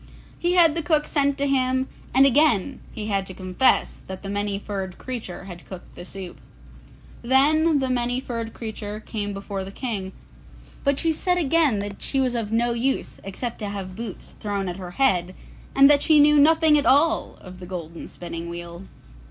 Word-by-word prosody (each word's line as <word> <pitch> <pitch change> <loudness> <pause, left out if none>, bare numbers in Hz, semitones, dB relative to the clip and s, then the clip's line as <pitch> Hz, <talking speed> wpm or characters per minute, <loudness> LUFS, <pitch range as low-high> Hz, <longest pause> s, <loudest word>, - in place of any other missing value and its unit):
He 350 +1 +1
had 340 -4 +6
the 330 - -1
cook 305 -1 +1
sent 280 -2 +1
to 280 - 0
him, 260 -1 +1 0.2
and 270 +1 +6
again 275 -3 +3
he 215 -3 -6
had 200 -2 0
to 185 - -9
confess 185 +7 +1
that 190 +1 -7
the 195 - -5
Many 205 0 -2
furred 195 -3 -5
Creature 230 -8 -6
had 180 -3 -10
cooked 185 -2 -11
the 175 - -9
soup. 185 0 -8 0.8
Then 295 +5 +3
the 265 -2 -1
Many 245 0 0
furred 230 -3 -5
Creature 215 -2 -6
came 205 -2 -4
before 195 -1 -5
the 190 - -8
King, 200 -5 -4 0.7
but 280 -1 +2
she 330 - +1
said 360 +3 +1
again 315 -6 +3
that 200 0 -5
she 270 - 0
was 255 -2 +1
of 225 -3 -2
no 235 +1 +2
use 255 +3 -2
except 230 +5 -5
to 210 -3 -4
have 190 -2 -6
boots 225 -2 -7
thrown 200 -2 -2
at 175 0 -4
her 185 -2 -7
head, 185 -9 +2 0.4
and 275 0 +8
that 285 0 +5
she 310 -2 +5
knew 295 0 +6
nothing 315 0 +5
at 285 - -1
all 285 +6 +3
of 185 -1 -12
the 180 - -9
golden 170 -2 -7
spinning 170 -1 -7
wheel. 170 +1 -7
230 Hz, 190 wpm, -24 LUFS, 195-275 Hz, 0.8 s, and